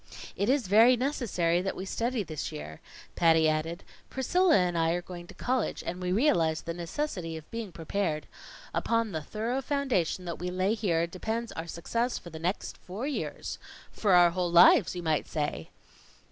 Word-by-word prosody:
"It 200 - 0
is 265 -3 +2
very 225 +6 +6
necessary 205 - 0
that 190 +1 -3
we 185 - -5
study 235 +3 -1
this 155 -5 -5
year," 75 +1 -8 0.3
Patty 160 -2 +4
added. 155 +3 -1 0.3
"Priscilla 355 +7 +3
and 180 -2 +1
I 165 0 +2
are 175 - -1
going 175 -1 -9
to - - -13
college, 255 -2 -1
and 180 +2 -4
we 180 0 -1
realize 170 - +2
the 170 - -4
necessity 170 - -4
of 155 - -11
being 230 -4 -5
prepared. 165 -1 -2 0.5
Upon 230 -2 0
the 160 -3 -3
thorough 225 - -2
foundation 255 - -1
that 170 -1 -5
we 180 +1 -3
lay 185 +3 +1
here, 175 -7 +1
depends 220 +7 -4
our 165 +1 -6
success 230 +9 -2
for 170 - -10
the 160 - -8
next 175 +5 -3
four 200 +8 -6
years 290 -1 -4 0.3
for 205 -4 +1
our 175 -1 +7
whole 175 -1 -1
lives 175 +1 +6
you 175 - -5
might 155 -2 0
say." 145 - -3
180 Hz, 180 wpm, -29 LUFS, 165-230 Hz, 0.5 s, our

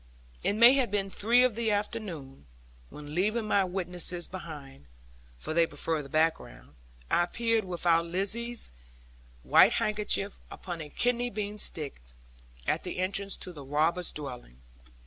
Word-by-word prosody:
It - - +2
may 235 +4 +8
have 255 -3 +2
been 195 -1 -1
three 235 +6 +4
of 255 -2 +3
the 230 +1 0
afternoon, 195 - -3 0.4
when 150 0 -9
leaving 215 +6 +1
my 200 -2 +3
witnesses 180 -1 -3
behind 145 - -9 0.5
(for 155 - -5
they 165 0 +4
preferred 160 -1 -2
the 140 - -11
background) 155 - -1 0.4
I - - +4
appeared 230 +4 0
with 180 -1 -5
our 165 -1 +5
Lizzie's 205 +8 -2 0.7
white - - +6
handkerchief 210 -1 0
upon 175 -3 -6
a 150 - -7
kidney 245 +6 0
bean 210 -1 -4
stick, 150 - -1 0.7
at - - +1
the - - -6
entrance 195 +1 -1
to 180 - -8
the 145 -3 -9
robbers' 160 +6 +1
dwelling. 125 - -8
180 Hz, 145 wpm, -29 LUFS, 155-210 Hz, 0.7 s, may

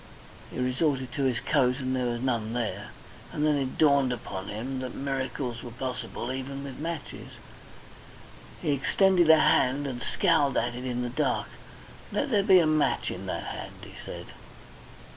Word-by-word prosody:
He - - -8
resorted 130 0 0
to 135 +3 -1
his 125 -3 +1
coat, 130 -4 +2
and 130 -1 -1
there 125 -1 0
was 120 0 -2
none 115 -4 0
there, 120 -3 -2 0.4
and 150 - 0
then 150 -1 +4
it 135 -2 -2
dawned 140 -4 +4
upon 100 -5 -5
him 130 +5 -4
that 130 -1 -5
miracles 130 -3 -3
were 120 - -7
possible 125 0 -4
even 135 +1 -5
with 140 -1 -7
matches. 165 +1 -5 1.4
He - - +1
extended 175 +5 +3
a 160 - +9
hand 135 +1 +3
and 125 -3 -4
scowled 160 -7 +2
at 120 +1 +1
it 125 +1 -6
in 125 -1 -1
the 120 - -2
dark. 125 - 0 0.6
"Let 280 - -1
there 210 -3 +4
be 195 -1 +6
a 170 - +5
match 155 -1 +2
in - - -6
that - - -3
hand," - - -6
he - - -10
said. - - -7
130 Hz, 175 wpm, -28 LUFS, 125-145 Hz, 1.4 s, a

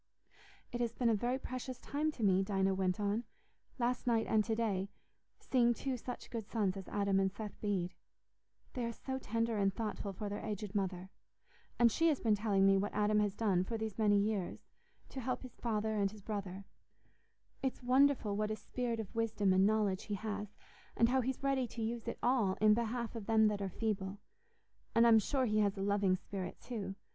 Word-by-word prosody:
"It 240 - -3
has 235 -1 0
been 240 -2 +2
a - - +4
very 240 +4 0
precious 255 -1 -5
time 295 +4 -1
to 235 - -5
me," 190 -2 +4
Dinah 195 -1 +1
went 190 0 0
on, 205 +3 0 0.5
"last 245 0 -1
night 230 -2 +3
and 215 -1 +3
to 225 - 0
day—seeing 230 +3 -1
two 265 +1 -2
such 250 +1 -7
good 225 -3 -5
sons 205 -5 0
as 195 -1 -7
Adam 200 -1 +1
and 190 0 +2
Seth 210 +1 -8
Bede. 190 -4 -1 0.8
They 250 - -2
are 235 - -2
so 265 +3 -4
tender 230 -1 -1
and 195 -1 +3
thoughtful 210 -1 -4
for 205 +2 -5
their 205 +1 -4
aged 210 -2 -4
mother. 190 -2 -2 0.7
And 235 -1 +5
she 330 +9 +2
has 300 -4 +2
been 220 -2 +2
telling 205 -2 +2
me 195 0 +6
what 205 +1 -2
Adam 210 0 +3
has 205 -1 +1
done, 195 -5 +2
for 225 +4 -3
these 220 -1 -4
many 205 -2 +4
years, 200 -2 0 0.5
to 265 - -6
help 255 +2 -2
his 255 -2 -9
father 220 -2 -1
and 200 -2 +1
his 210 0 -12
brother; 195 -2 -5 1.0
it's 265 -1 -2
wonderful 255 -4 +3
what 210 +1 0
a 215 - -1
spirit 235 0 -3
of 215 -4 -6
wisdom 220 -4 +1
and 190 +1 +5
knowledge 210 -3 +1
he 205 - -2
has, 205 0 -5 0.4
and 230 - +5
how 260 +1 +3
he's 260 +2 -3
ready 270 -2 +1
to 230 0 -5
use 230 +1 -3
it 235 - -3
all 235 -7 +3
in 215 0 +6
behalf 235 +1 -2
of 220 -3 -6
them 220 -1 +5
that 205 -1 -2
are 195 - -2
feeble. 200 -1 -2 0.8
And 230 +1 +6
I'm 225 -1 +7
sure 260 +5 0
he 215 -2 +2
has 200 -1 +2
a 195 - -2
loving 200 -2 +2
spirit 185 0 -6
too. 210 -5 -5
215 Hz, 205 wpm, -35 LUFS, 200-235 Hz, 1.0 s, I'm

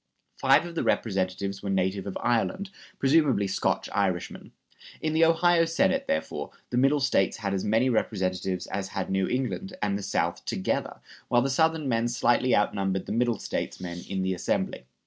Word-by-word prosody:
Five 135 +4 +4
of 170 - -7
the 165 - -1
Representatives 95 -1 -1
were 100 - -4
native 95 0 0
of 95 - -4
Ireland, 185 - 0 0.3
presumably 135 -6 +3
Scotch 95 - 0
Irishmen. 95 -4 -2 0.5
In 155 0 -1
the 160 +1 +4
Ohio 165 +1 +4
Senate, 190 +11 +1
therefore, 170 - -2 0.2
the 120 - 0
Middle 135 +3 +4
States 135 -8 +1
had 100 -3 -2
as 95 - -1
many 110 +5 +2
representatives 95 -5 -1
as 100 -1 -4
had 95 -1 -4
New 95 -1 +1
England 115 -8 -3
and 100 -1 0
the - - -6
South - - -1
together, - - -2 0.3
while 120 0 +3
the 135 - 0
Southern 160 +1 +2
men 115 -1 +1
slightly 120 +1 +2
outnumbered 95 -2 0
the - - -6
Middle 120 -1 +1
States - - -4
men 90 -1 -6
in 95 -1 -1
the 95 0 0
Assembly. 90 -7 -2
110 Hz, 175 wpm, -27 LUFS, 95-140 Hz, 0.5 s, Five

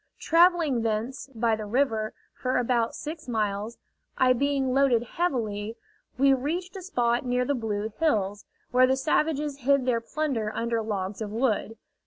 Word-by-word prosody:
Travelling 330 -6 +3
thence, 230 +5 -2
by 225 0 +2
the 215 -1 -6
river, 220 -2 0 0.2
for 255 0 -1
about 240 -2 +1
six 310 -1 -7
miles, 215 -1 -2 0.4
I 255 -1 +5
being 270 0 0
loaded 265 -4 +3
heavily, 225 -8 -2 0.4
we 275 +1 +5
reached 340 +8 -2
a 385 - -6
spot 240 -10 0
near 250 0 0
the 285 - +1
Blue 220 -3 -3
Hills, 205 -10 0 0.3
where 255 +1 +5
the 265 +1 +2
savages 300 +1 0
hid 275 0 +2
their 240 -2 +1
plunder 240 -5 -2
under 230 0 0
logs 200 -2 -3
of 210 -1 -4
wood. 225 -1 0
250 Hz, 155 wpm, -27 LUFS, 220-280 Hz, 0.4 s, I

